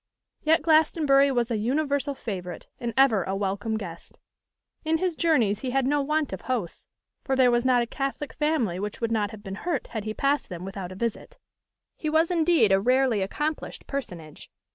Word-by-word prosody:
Yet 315 0 +3
Glastonbury 305 -3 +4
was 240 -2 0
an 220 -2 0
universal 280 +3 0
favourite, 185 -8 -6
and 235 -1 -3
ever 245 -8 +5
a 190 - -3
welcome 205 +3 -2
guest. 170 -5 -9 0.7
In 320 0 +1
his 360 0 -1
journeys 245 -13 +2
he 260 - -3
had 265 +1 +1
no 290 +2 +2
want 300 -3 -1
of 190 - -5
hosts; 235 -10 -4 0.4
for 270 - 0
there 255 -2 +5
was 240 +1 +1
not 250 -2 +4
a - - -2
Catholic 275 +4 -4
family 285 - 0
which 210 +1 -4
would 230 -1 -1
not 210 -2 +1
have 215 -1 -11
been 195 -2 -6
hurt 335 -7 -2
had 220 -3 -4
he 215 0 -4
passed 280 +1 0
them 180 0 -6
without 195 -2 -6
a - - -8
visit. 235 - -4 0.6
He 310 - -2
was 320 +3 +2
indeed 325 - +3
a 195 0 +4
rarely 250 -2 +2
accomplished 295 +11 -3
personage. 175 - -7
250 Hz, 190 wpm, -26 LUFS, 205-295 Hz, 0.7 s, ever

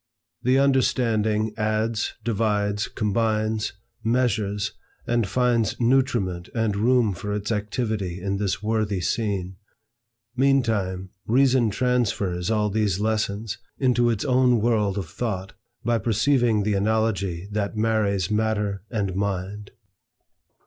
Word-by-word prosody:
The 130 +2 +3
understanding 110 -6 +2
adds, 110 +1 0
divides, 105 -2 0
combines, 110 0 0 0.3
measures, 105 -4 0 0.3
and 120 -3 +1
finds 120 -1 +1
nutriment 120 -8 +1
and 110 -3 +1
room 115 0 +3
for 105 +4 -4
its 105 +2 -3
activity 105 -3 -2
in 100 +1 -2
this 100 0 -2
worthy 110 -3 0
scene. 95 -2 -2 0.8
Meantime, 110 -9 +1 0.2
Reason 130 -1 +4
transfers 105 -6 0
all 105 -2 +1
these 105 -3 +1
lessons 110 0 -1 0.2
into 125 -2 +3
its 115 -4 -1
own 125 -2 +4
world 105 -3 +1
of 95 -5 -3
thought, 95 -4 -4 0.3
by 120 -1 +2
perceiving 120 0 +2
the 105 +1 0
analogy 100 -3 0
that 105 0 -2
marries 105 -4 +1
Matter 105 -2 0
and 100 -5 -2
Mind. 100 +1 -3
110 Hz, 115 wpm, -24 LUFS, 100-115 Hz, 0.8 s, Reason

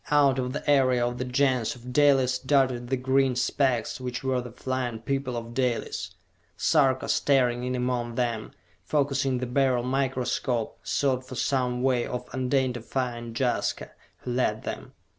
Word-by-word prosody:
Out 140 -3 +4
of 125 0 -2
the 145 - -5
area 130 -4 +4
of 120 0 -3
the - - 0
Gens 125 -2 +1
of 125 +1 -9
Dalis 135 -3 +4
darted 130 -3 +1
the 130 +1 0
green 130 0 +2
specks 130 -1 0
which 125 0 -4
were 130 -1 0
the 125 -1 -9
flying 125 -1 -3
people 130 +1 -2
of 115 0 -6
Dalis! 125 -2 -2 0.4
Sarka, 135 -5 +2
staring 125 -3 +2
in 125 0 -1
among 125 -1 -1
them, 115 -3 -1 0.3
focussing 135 -3 +1
the 125 - -2
Beryl 125 -1 +1
microscope, 130 -2 -1
sought 130 -2 0
for 130 - -7
some 125 -1 0
way 125 -2 +2
of 125 0 -5
identifying 125 -2 -1
Jaska, 125 -1 -1 0.3
who 125 - -5
led 110 -3 0
them. - - -6
125 Hz, 155 wpm, -27 LUFS, 120-135 Hz, 0.4 s, Out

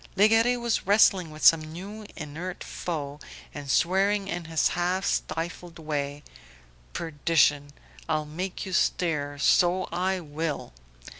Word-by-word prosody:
Legare 225 +4 +4
was 235 -4 -1
wrestling 195 -4 +4
with 155 0 -5
some 165 -1 +8
new 195 +7 -8
inert 165 +4 -6
foe, 145 -4 -5 0.3
and 145 -2 -8
swearing 195 +6 +2
in 175 -3 -4
his 160 -1 +1
half 180 +2 -1
stifled 170 +1 -3
way: 145 -2 -4 0.7
"Perdition! 150 -2 +1 0.4
I'll 155 -1 0
make 180 +7 -5
you 190 - -6
stir, 150 -5 0
so 180 +5 +3
I 185 +2 0
will." 155 - -4
170 Hz, 125 wpm, -27 LUFS, 150-190 Hz, 0.7 s, some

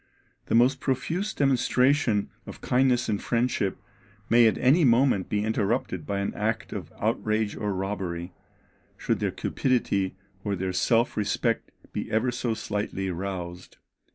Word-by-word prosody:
The - - +1
most 130 +3 +4
profuse 165 +11 -1
demonstration 130 - +2 0.2
of - - -9
kindness 125 -1 +2
and 105 -2 -1
friendship 115 -5 0 0.5
may 120 0 +7
at 110 - +1
any 145 +7 +4
moment 120 -5 +3
be 105 0 0
interrupted 110 - -1
by 100 0 -1
an 100 - -2
act 110 +1 -2
of - - -6
outrage 110 -1 0
or 105 -1 -2
robbery, 95 -2 -3 0.6
should - - -1
their - - 0
cupidity 100 -8 0 0.3
or 100 -1 -1
their 95 0 -2
self 115 +6 +2
respect 110 +2 0 0.2
be - - -4
ever 115 +3 +1
so 120 -1 -2
slightly 100 -3 -3
roused." 90 -1 -6
110 Hz, 140 wpm, -26 LUFS, 100-125 Hz, 0.6 s, may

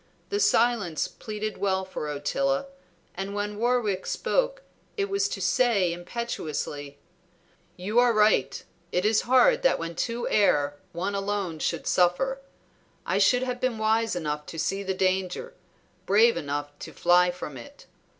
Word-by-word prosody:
The 410 - -1
silence 225 - +2
pleaded 215 0 -6
well 190 -1 0
for 170 -5 -5
Ottila, 275 - -1 0.5
and 195 +2 -5
when 205 0 -3
Warwick 230 -5 0
spoke - - 0 0.3
it 400 -1 -1
was 400 +1 +1
to - - -4
say 215 -9 +2
impetuously 160 -7 -5 0.8
"You 205 +6 +1
are 245 0 +5
right! 210 - +2 0.3
It 180 +2 0
is 215 0 +3
hard 470 - +5
that - - +3
when 165 0 -5
two 235 +7 -2
err 145 -9 +2 0.2
one 185 +4 -3
alone 195 -4 -2
should - - -2
suffer. 225 +10 +1 0.6
I - - 0
should 250 0 +4
have 250 -1 -3
been 255 -3 0
wise 220 -1 +1
enough 150 -3 -3
to 165 - -8
see 195 +5 -1
the 190 -1 -2
danger, 185 - -1 0.5
brave 220 +4 +5
enough 145 0 -3
to - - -9
fly 180 0 +4
from 175 -5 -6
it. 120 -2 -12
205 Hz, 150 wpm, -26 LUFS, 175-240 Hz, 0.8 s, are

